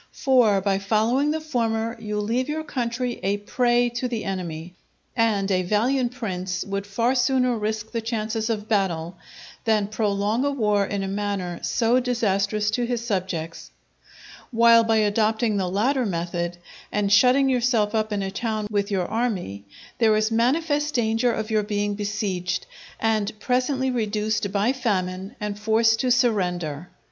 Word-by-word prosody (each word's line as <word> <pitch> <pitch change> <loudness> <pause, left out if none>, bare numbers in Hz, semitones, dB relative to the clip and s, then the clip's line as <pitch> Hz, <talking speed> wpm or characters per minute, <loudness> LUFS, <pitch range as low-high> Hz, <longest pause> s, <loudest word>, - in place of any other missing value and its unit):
For 240 -7 +3
by 195 0 +1
following 225 +8 +1
the 315 +1 0
former, 230 -6 -1
you 210 -1 -3
leave 240 +6 -1
your 315 +1 -2
country 245 -3 -3
a 200 +2 0
prey 240 +3 +1
to 240 +2 -3
the 235 -3 -3
enemy, 175 -3 -5 0.4
and 210 -4 +1
a 185 -1 +2
valiant 240 +7 +1
prince 185 -6 -3
would 200 0 -4
far 230 +5 +1
sooner 255 -1 +2
risk 215 0 -3
the 230 - -2
chances 225 0 -2
of 215 -2 -2
battle 180 -5 0 0.5
than 215 -2 +2
prolong 210 +2 0
a 285 - +2
war 210 -7 +1
in 200 -1 -2
a - - -3
manner 195 -3 -3
so 235 +2 +2
disastrous 210 -4 0
to 240 +2 0
his 240 -1 -2
subjects; 180 -6 -3 0.8
while 230 -1 +6
by 225 0 +2
adopting 215 +1 +1
the 185 -2 -1
latter 250 +8 +1
method, 175 -1 -3 0.3
and 205 -1 +1
shutting 255 +6 +5
yourself 240 -4 +1
up 215 -1 0
in 205 -1 -1
a 195 - -3
town 215 0 -2
with 200 0 0
your 190 -3 0
army, 190 - -2 0.3
there 220 -2 +4
is 215 +1 +1
manifest 290 +6 +1
danger 230 0 +2
of 220 -1 -3
your 215 -1 +3
being 205 0 -1
besieged, 200 -4 -2 0.3
and 215 -1 0
presently 260 +2 0
reduced 215 -3 -1
by 205 +5 +1
famine 195 -4 -2
and 210 -1 -4
forced 220 +1 +3
to 255 - +1
surrender. 180 - 0
215 Hz, 155 wpm, -24 LUFS, 200-240 Hz, 0.8 s, while